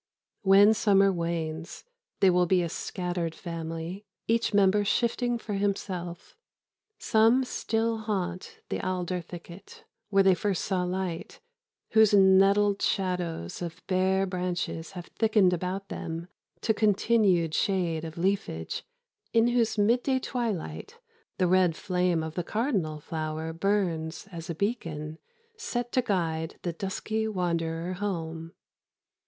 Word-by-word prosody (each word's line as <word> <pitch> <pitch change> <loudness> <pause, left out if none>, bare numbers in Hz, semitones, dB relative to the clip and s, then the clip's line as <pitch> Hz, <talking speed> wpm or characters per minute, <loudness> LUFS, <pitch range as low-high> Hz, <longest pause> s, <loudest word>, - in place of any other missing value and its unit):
When 200 +1 +7
summer 195 -2 +4
wanes, 165 -1 -3 0.4
they 190 - +6
will 180 0 +3
be 180 0 +3
a 170 - -2
scattered 175 -1 -3
family, 165 +2 -5 0.2
each 230 +1 +2
member 205 0 +4
shifting 240 +3 +1
for 220 -2 -6
himself. 190 -3 -3 0.6
Some 225 +4 +4
still 225 -2 -1
haunt 185 -5 -4
the - - -2
alder 180 -1 -2
thicket 175 - -11 0.3
where 195 -1 +4
they 190 -1 +6
first 190 +2 -1
saw 190 -3 0
light, 180 -2 -4 0.5
whose 220 -2 +6
netted 195 +1 +5
shadows 180 - -1
of 170 -2 -6
bare 190 +1 +2
branches 180 -2 -3
have 175 -2 -7
thickened 215 -4 +3
about 185 +3 -3
them 165 +2 -5 0.3
to 220 - +2
continued 205 -5 +3
shade 170 -4 0
of 160 0 -7
leafage, 170 - -1 0.5
in 230 +1 +4
whose 235 -2 +1
midday 245 +5 +3
twilight 240 - -4 0.4
the 185 - +2
red 180 -2 +3
flame 180 -4 0
of 160 -1 -5
the 175 - -2
cardinal 195 - -1
flower 155 +1 -4
burns 170 -2 -1
as 170 0 -8
a 170 - -2
beacon 160 -6 -3 0.4
set 240 - -3
to 255 - +3
guide 165 -7 -1
the 175 - -2
dusky 215 +5 -2
wanderer 170 -3 -1
home. 165 -4 -4
185 Hz, 125 wpm, -28 LUFS, 170-205 Hz, 0.6 s, When